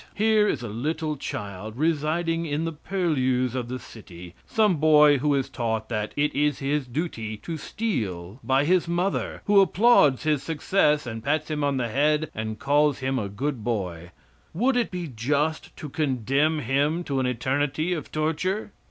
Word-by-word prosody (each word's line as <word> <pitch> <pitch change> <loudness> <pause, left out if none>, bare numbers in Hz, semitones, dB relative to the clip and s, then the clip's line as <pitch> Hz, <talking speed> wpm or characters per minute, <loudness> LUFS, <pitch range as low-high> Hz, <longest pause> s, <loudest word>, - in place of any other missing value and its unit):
Here 215 0 +3
is 125 - -1
a - - -4
little 150 +8 -2
child, 105 -4 -6
residing 165 +2 0
in 150 +2 -1
the 165 - -2
purlieus 140 -8 0
of 125 -2 -3
the 130 +1 -4
city 90 -8 -12
some 210 -6 +2
boy 150 -2 +6
who 145 +1 +2
is 135 -2 0
taught 110 -2 -3
that 105 -2 -2
it 150 +1 +1
is 145 0 +1
his 140 0 -1
duty 120 -6 -4
to 165 +9 -6
steal 110 - -4
by 135 +2 +2
his 180 +1 +2
mother, 175 +3 -1
who 205 -1 +6
applauds 190 - +4
his 150 -3 +1
success 150 0 +1
and 115 -2 -6
pats 155 +3 -1
him 150 -1 -1
on 140 -1 +1
the 120 -2 -1
head 150 +5 +1
and 110 0 -4
calls 145 +2 +2
him 130 -1 -1
a 100 -3 -3
good 125 +3 -3
boy 90 -7 -3 0.5
would 250 +8 +2
it 245 -1 +1
be 180 -2 -4
just 145 +5 -1
to 150 - -6
condemn 145 +1 0
him 145 +7 0
to 140 -5 -2
an 130 - +1
eternity 140 +7 0
of 160 -4 -5
torture? 165 +7 -1
145 Hz, 175 wpm, -25 LUFS, 125-160 Hz, 0.5 s, boy